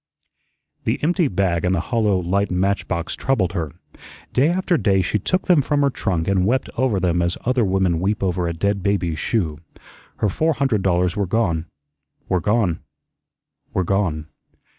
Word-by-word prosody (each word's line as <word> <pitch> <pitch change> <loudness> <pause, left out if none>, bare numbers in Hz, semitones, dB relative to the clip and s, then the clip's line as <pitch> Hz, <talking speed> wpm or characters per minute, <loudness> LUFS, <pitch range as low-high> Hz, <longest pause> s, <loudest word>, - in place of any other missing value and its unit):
The - - +1
empty 175 +1 +2
bag 90 -5 0
and 90 +1 +2
the - - 0
hollow, 110 -5 +2
light 95 +3 0
match 95 +1 0
box 85 -1 -2
troubled 100 -10 0
her. 80 -5 -2 0.6
Day 140 +5 +3
after 180 0 +1
day 95 - +2
she 105 +4 0
took 185 - -1
them 175 -5 +5
from 145 +1 0
her 140 - +2
trunk 90 -9 -2
and 95 -2 +2
wept 120 +7 0
over 120 -6 +1
them 90 -1 +1
as 85 0 0
other 125 -1 +2
women 95 -4 +1
weep 100 +4 -1
over 90 -2 0
a 85 - -2
dead 100 +4 -1
baby's 90 -5 0
shoe. 85 -10 -1 0.6
Her 105 - 0
four 160 - +1
hundred 135 -8 0
dollars 90 -1 +1
were 100 -2 -1
gone, 85 -6 0 0.6
were 90 -2 +1
gone, 105 -5 +1 1.0
were 95 - +2
gone. 85 -5 0
95 Hz, 175 wpm, -21 LUFS, 90-115 Hz, 1.0 s, them